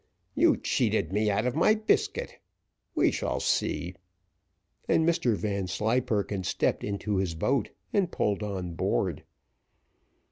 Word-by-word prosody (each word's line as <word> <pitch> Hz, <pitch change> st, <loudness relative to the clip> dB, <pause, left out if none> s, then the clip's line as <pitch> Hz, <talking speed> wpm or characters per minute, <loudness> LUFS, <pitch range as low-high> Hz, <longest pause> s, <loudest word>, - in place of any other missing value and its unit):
You -, -, +4 dB
cheated 80 Hz, -, 0 dB
me 105 Hz, +1 st, +2 dB
out 105 Hz, +3 st, +1 dB
of 125 Hz, -, 0 dB
my 215 Hz, +7 st, +4 dB
biscuit 215 Hz, 0 st, 0 dB, 0.6 s
we -, -, +4 dB
shall -, -, -2 dB
see;" 90 Hz, +2 st, 0 dB, 1.0 s
and 160 Hz, -, +3 dB
Mr 165 Hz, -10 st, +2 dB
Vanslyperken 105 Hz, +2 st, -1 dB
stepped 90 Hz, -, 0 dB
into 100 Hz, 0 st, -2 dB
his 95 Hz, -4 st, -1 dB
boat 125 Hz, +7 st, 0 dB, 0.2 s
and 195 Hz, -4 st, +2 dB
pulled 105 Hz, 0 st, 0 dB
on 95 Hz, -4 st, -4 dB
board. -, -, -1 dB
105 Hz, 120 wpm, -28 LUFS, 95-125 Hz, 1.0 s, You